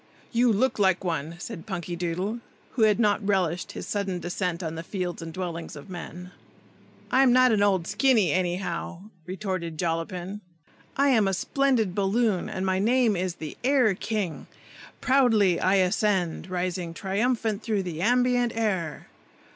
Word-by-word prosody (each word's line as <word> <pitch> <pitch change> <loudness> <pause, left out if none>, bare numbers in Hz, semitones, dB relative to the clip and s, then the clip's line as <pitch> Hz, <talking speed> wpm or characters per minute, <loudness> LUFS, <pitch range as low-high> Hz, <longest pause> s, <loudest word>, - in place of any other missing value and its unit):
"You 240 0 +3
look 225 +3 +1
like 190 -2 +3
one!" 165 -2 -2
said 200 +1 -8
Punkydoodle, 180 +3 -3 0.3
who 245 - -3
had 215 0 +4
not 210 -1 +2
relished 185 -4 0
his - - -6
sudden 200 -3 -2
descent 175 0 -3
on 160 -1 -3
the 165 - -5
fields 180 0 -4
and 165 0 -6
dwellings 170 -2 -5
of 145 +6 -11
men. 180 0 -8 0.8
"I'm 260 -1 +5
not 255 0 +5
an 210 -2 +2
old 190 -4 +2
Skinny, 215 - +3
anyhow!" 180 0 -2 0.3
retorted 185 -4 -4
Jollapin. 175 +4 -3 0.6
"I 280 +1 +4
am 220 -6 +4
a 195 - +1
splendid 250 -4 +1
balloon, 200 0 +1
and 190 0 -3
my 190 0 +1
name 235 +1 +3
is 180 -1 -2
the 155 -3 -7
Air 255 -5 +4
King. 200 -4 -3 0.5
Proudly 225 -9 +3
I 190 +1 +3
ascend, 185 -2 +1
rising 180 -2 -3
triumphant 215 +2 -1
through 210 -3 -1
the 170 -3 -5
ambient 245 +2 +2
air." 190 -9 -2
190 Hz, 150 wpm, -26 LUFS, 175-220 Hz, 0.8 s, I'm